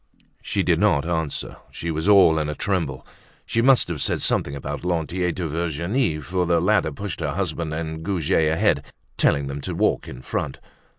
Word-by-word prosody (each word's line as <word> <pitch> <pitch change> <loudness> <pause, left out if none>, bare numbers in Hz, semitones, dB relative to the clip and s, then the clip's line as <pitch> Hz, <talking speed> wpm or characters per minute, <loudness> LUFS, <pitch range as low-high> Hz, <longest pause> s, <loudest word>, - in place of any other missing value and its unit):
She - - -1
did - - +2
not 70 +3 +2
answer. 80 -4 -2
She 85 - -4
was 80 +3 -2
all 90 -6 +6
in 75 -1 -1
a 75 - -3
tremble. 85 -9 -2 0.4
She 115 - 0
must 130 +1 +5
have 85 -5 -3
said - - +1
something 70 - +1
about 70 - -5
Lantier 90 +1 -1
to 85 -1 -3
Virginie, 85 - -1
for 90 +3 -1
the 85 -1 +3
latter 80 - +2
pushed 100 +5 -5
her 75 -4 -2
husband 85 -4 -2
and 80 0 -4
Goujet 80 -3 +1
ahead, 80 - +2 0.3
telling 70 -1 +2
them 70 +1 -5
to - - -4
walk - - +1
in 65 -1 -9
front. 70 -3 -3
80 Hz, 185 wpm, -23 LUFS, 75-90 Hz, 0.4 s, all